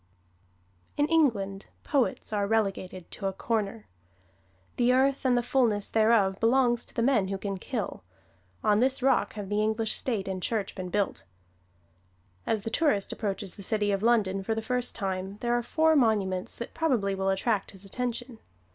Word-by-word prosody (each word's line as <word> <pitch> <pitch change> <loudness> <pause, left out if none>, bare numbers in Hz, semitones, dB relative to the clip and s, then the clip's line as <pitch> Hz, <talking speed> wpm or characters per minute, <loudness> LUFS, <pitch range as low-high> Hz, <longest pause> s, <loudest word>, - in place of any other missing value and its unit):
In 290 - +3
England 215 -12 +1 0.2
poets 260 -4 0
are 205 -1 +1
relegated 195 -4 -1
to 195 - -3
a 195 - -2
"Corner." 220 0 -2 0.9
The 245 0 +4
earth 270 +2 +2
and 250 -1 +4
the 240 - +1
fulness 235 -5 +1
thereof 215 -3 +3
belongs 240 0 +3
to - - -16
the 230 - +1
men 235 -7 +3
who 195 0 -2
can 195 -1 -4
kill; 220 -4 -4 0.6
on 210 0 +3
this 260 +1 +1
rock 270 - +2
have 205 -2 -6
the 210 0 +1
English 220 +1 +1
State 220 -7 0
and 190 -1 -3
Church 210 0 -2
been 185 -2 -6
built. 200 +1 -1 1.2
As 215 -2 0
the 225 - -4
tourist 230 -9 +1
approaches 200 -2 -3
the - - -11
city 205 +1 0
of 195 -1 0
London 210 -4 +2
for 220 +3 -1
the 225 - -2
first 250 +1 -1
time, 190 -1 -3
there 240 0 0
are 240 - +1
four 315 +6 +2
monuments 205 -8 +1
that 235 - -7
probably 250 -12 +1
will 195 0 -1
attract 195 +2 0
his 195 0 -10
attention. 245 +2 -4
220 Hz, 175 wpm, -28 LUFS, 195-245 Hz, 1.2 s, The